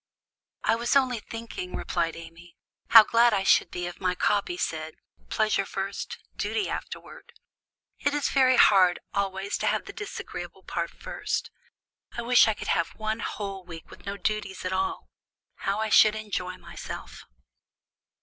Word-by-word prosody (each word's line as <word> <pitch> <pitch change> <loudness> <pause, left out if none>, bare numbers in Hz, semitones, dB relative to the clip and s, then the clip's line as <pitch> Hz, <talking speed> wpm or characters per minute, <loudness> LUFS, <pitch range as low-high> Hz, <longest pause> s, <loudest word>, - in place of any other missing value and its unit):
"I - - +3
was 235 +3 0
only 255 -4 +3
thinking," 225 -5 -7
replied 165 -1 -1
Amy, 165 +1 -12 0.3
"how 225 -1 +10
glad 230 +1 +4
I 195 - 0
should - - +4
be 175 0 -4
if 175 +2 -7
my 180 -1 +1
copy 205 - +1
said, 160 - -3 0.3
'Pleasure 215 -2 +1
first 195 0 -4 0.2
duty 420 - -1
afterward.' 480 - -7 0.7
It 285 0 0
is 295 - 0
very 260 -2 +4
hard 185 -3 +6 0.2
always 195 0 -2
to - - 0
have - - 0
the - - -8
disagreeable 415 -2 -7
part - - -3
first. - - -4 0.7
I 235 - -2
wish 245 0 +6
I 220 - +1
could - - -6
have 170 - 0
one 220 +1 -2
whole 195 -3 -5
week 165 -2 -11
with - - -14
no 200 0 -3
duties 205 -3 -3
at 185 - -1
all! 190 0 -2 0.5
How 200 +2 -1
I 220 0 -1
should 215 0 +6
enjoy 185 -4 -4
myself!" 170 -1 -8
200 Hz, 160 wpm, -27 LUFS, 185-230 Hz, 0.7 s, how